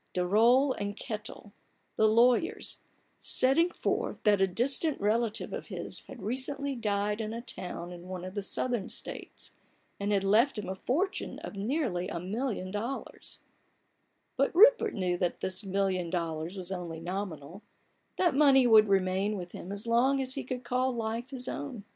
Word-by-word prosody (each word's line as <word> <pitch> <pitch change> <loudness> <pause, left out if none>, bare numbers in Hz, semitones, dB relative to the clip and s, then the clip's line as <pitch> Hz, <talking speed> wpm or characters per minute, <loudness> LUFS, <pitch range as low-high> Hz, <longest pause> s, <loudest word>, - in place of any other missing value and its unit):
Daroll 230 +9 +4
and 205 +1 -3
Kettel, 215 -3 -6 0.4
the 220 - +4
lawyers, 240 - +2 0.4
setting 295 +7 +3
forth - - -2
that 205 -2 +4
a 195 - +5
distant 270 - +2
relative 220 +1 0
of - - -5
his - - -2
had 230 - -10
recently 270 +5 -2
died 210 -1 -1
in 220 0 -4
a 230 - -5
town 180 -6 -6
in 175 0 -10
one 185 -1 -6
of 185 - -7
the 205 - -2
Southern 225 +1 -2
States, - - -4 0.5
and 200 +1 -1
had 200 -1 +2
left 225 +7 +3
him 205 -3 -4
a - - -1
fortune 315 - -2
of - - -7
nearly 205 - -1
a 170 - -4
million 195 0 -3
dollars 230 +7 -5 1.0
But 275 +4 +1
Rupert 455 +2 +6
knew 180 -3 0
that 175 -1 -1
this 190 +2 -1
million 190 -2 0
dollars 165 +1 -3
was 185 0 -4
only 175 -3 -5
nominal, 175 -1 -5 0.6
that 350 -4 +3
money 270 -2 +6
would 220 -2 +7
remain 195 +1 +1
with 175 -1 -7
him 185 - -8
as 200 +2 -3
long 245 +4 +3
as 260 -1 +1
he 275 - -4
could 250 0 -5
call 255 +2 0
life 230 +2 -3
his 260 -2 -4
own. 260 -8 -5
215 Hz, 165 wpm, -30 LUFS, 190-255 Hz, 1.0 s, would